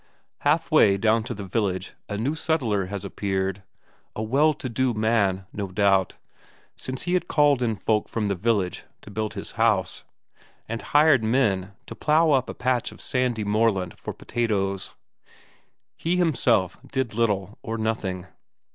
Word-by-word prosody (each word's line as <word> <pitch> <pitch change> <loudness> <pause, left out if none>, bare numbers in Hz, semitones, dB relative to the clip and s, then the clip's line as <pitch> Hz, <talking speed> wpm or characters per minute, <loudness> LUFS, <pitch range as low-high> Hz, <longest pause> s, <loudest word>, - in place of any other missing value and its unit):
Half - - +1
way 100 -1 +5
down 110 +2 +2
to 120 -1 -4
the 100 - -6
village 95 -2 -2 0.2
a 105 - -3
new 125 +8 0
settler 125 - 0
has 100 0 -5
appeared. 95 -1 -2 0.5
A 110 - -3
well 145 +7 +3
to 130 - -5
do 125 0 0
man, 105 -4 +1
no 100 -1 -3
doubt, 95 -1 +2 0.6
since 130 0 -5
he 175 - -1
had 180 - +1
called 145 -3 +3
in 115 -3 +1
folk 105 +1 0
from 110 -2 -2
the 100 - +1
village 100 -1 0 0.2
to 105 - -12
build 110 +1 -3
his - - -5
house, - - +2 0.6
and 115 +1 -4
hired 145 -5 +4
men 105 -5 +1
to - - -8
plough 155 +1 +3
up 130 -3 +2
a - - -6
patch 125 -1 0
of - - -14
sandy 125 -4 0
moorland 105 -4 +1
for - - -6
potatoes; 100 -5 -2 1.0
he 170 +2 -1
himself 120 - +2
did 130 -5 -1
little 105 -3 -1
or 115 0 -4
nothing. 105 -5 -2
110 Hz, 160 wpm, -25 LUFS, 100-125 Hz, 1.0 s, way